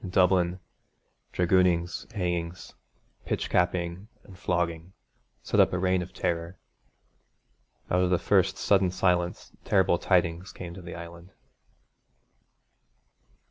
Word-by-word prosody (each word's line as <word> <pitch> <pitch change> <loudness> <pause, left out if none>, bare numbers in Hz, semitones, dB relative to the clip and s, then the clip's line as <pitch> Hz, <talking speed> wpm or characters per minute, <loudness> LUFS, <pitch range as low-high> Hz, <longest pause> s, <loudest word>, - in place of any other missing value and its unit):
In 95 - -5
Dublin, 90 -1 +2 0.7
dragoonings, 90 -1 +1
hangings, 85 -3 -3 0.5
pitch - - -3
capping 90 +2 0 0.2
and 95 - -14
flogging 85 0 -2 0.5
set - - 0
up - - +5
a - - +1
reign 90 0 +1
of 90 - -7
terror. 85 +1 -3 1.3
Out 90 - +3
of 90 - +2
the 90 - +3
first 95 0 +2
sudden 95 -2 +3
silence 90 -1 0
terrible 95 -3 +2
tidings 90 -1 +1
came 85 -1 -8
to 95 - -10
the 85 -1 -8
Island. 85 +2 -10
90 Hz, 115 wpm, -27 LUFS, 85-95 Hz, 1.3 s, up